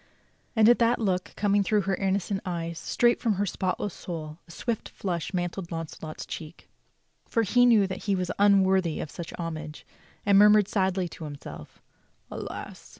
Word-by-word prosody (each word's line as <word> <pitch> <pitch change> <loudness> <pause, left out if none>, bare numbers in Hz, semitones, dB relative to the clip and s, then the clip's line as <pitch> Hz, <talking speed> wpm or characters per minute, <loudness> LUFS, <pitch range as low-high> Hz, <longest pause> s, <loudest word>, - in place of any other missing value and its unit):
And 220 -1 +6
at 240 - +6
that 235 +1 +3
look, 185 -5 -1
coming 205 0 +2
through 210 +2 +2
her 195 0 -1
innocent 195 +1 -1
eyes 170 -2 -4
straight 240 -1 +2
from 230 -4 +2
her 200 +1 0
spotless 190 +1 -2
soul, 155 -2 -7
a - - -13
swift 230 +5 -3
flush 175 -4 -3
mantled 175 -1 -3
Launcelot's 160 -1 -6
cheek, 160 +1 -8 0.6
for 230 - +1
he 245 +4 +4
knew 220 -4 +5
that 190 - -6
he 200 -1 +2
was 185 -1 -2
un 200 -1 +6
worthy 185 -4 +1
of 150 - -5
such 170 -2 -7
homage, 160 -2 -6 0.4
and 200 -1 +4
he - - +8
murmured 210 -1 +6
sadly 190 -3 0
to 160 - -9
himself: 145 -1 -10 0.5
"Alas! - - -7
190 Hz, 175 wpm, -27 LUFS, 170-205 Hz, 0.6 s, he